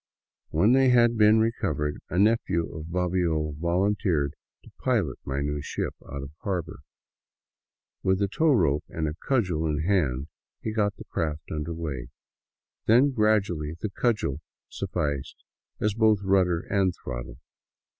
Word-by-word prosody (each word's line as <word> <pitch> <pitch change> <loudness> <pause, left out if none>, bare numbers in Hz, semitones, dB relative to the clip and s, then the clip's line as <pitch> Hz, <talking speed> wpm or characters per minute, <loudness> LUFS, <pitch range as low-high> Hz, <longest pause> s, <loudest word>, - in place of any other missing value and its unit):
When 90 +9 +3
they 130 0 +5
had 120 -1 +5
been 105 0 +6
recovered, 75 - -1
a 85 - -2
nephew 100 -5 +2
of 80 0 -6
Bobbio 85 -3 0
volunteered 85 -4 +1 0.3
to - - -16
pilot 105 - 0
my 70 +1 -2
new 75 0 -2
ship - - -3 0.2
out 70 0 -5
of 70 - -8
harbor. 90 -5 -3 1.2
With 95 0 +2
the 100 +1 +1
tow 160 +11 +1
rope 80 - +2
and 80 -1 -2
a 75 - -2
cudgel 90 - +1
in 75 0 -1
hand 75 -9 +1 0.3
he 110 - -4
got 105 -2 +1
the - - -11
craft 75 -1 -3
under 80 +2 -3
way, 70 -7 -4 0.8
then 125 +6 +5
gradually 100 - +1
the 105 - -3
cudgel 100 - 0 0.3
sufficed 70 -2 -3 0.4
both 110 0 +3
as 100 - -9
rudder 90 -3 +3
and 95 -2 0
throttle. - - -6
90 Hz, 145 wpm, -26 LUFS, 75-105 Hz, 1.2 s, been